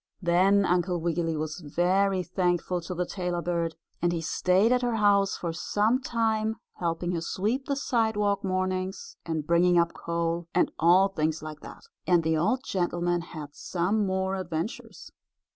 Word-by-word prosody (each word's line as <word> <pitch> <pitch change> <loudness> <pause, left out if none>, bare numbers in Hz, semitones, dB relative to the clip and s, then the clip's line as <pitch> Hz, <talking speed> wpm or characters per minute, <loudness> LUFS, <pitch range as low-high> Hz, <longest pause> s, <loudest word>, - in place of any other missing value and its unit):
Then 190 +3 +4
Uncle 180 0 +1
Wiggily 165 -1 -1
was 155 +3 -4
very 180 +4 +1
thankful 180 0 -1
to 180 +2 -6
the 180 +1 -1
tailor 180 -2 -3
bird, 170 -2 -1 0.3
and 175 - +2
he 170 - -1
stayed 185 +6 +2
at 250 0 +3
her 240 -2 0
house 200 -2 +3
for 170 -2 -3
some 215 +9 +1
time, 220 -3 0 0.2
helping 170 0 -1
her 170 -2 -2
sweep 220 +10 -2
the 280 - 0
sidewalk 220 -6 0
mornings, 185 - -2
and 160 -2 -2
bringing 175 +2 +4
up 170 0 +2
coal, 170 0 -2
and 180 - +3
all 180 +4 +5
things 155 -4 -1
like 155 -1 -7
that. - - -12 0.2
And 175 -2 +4
the 160 0 +1
old 215 +11 +1
gentleman 175 -1 0
had 155 -4 -9
some 190 +7 -1
more 190 0 -1
adventures. 175 +2 -5
180 Hz, 160 wpm, -27 LUFS, 170-200 Hz, 0.3 s, all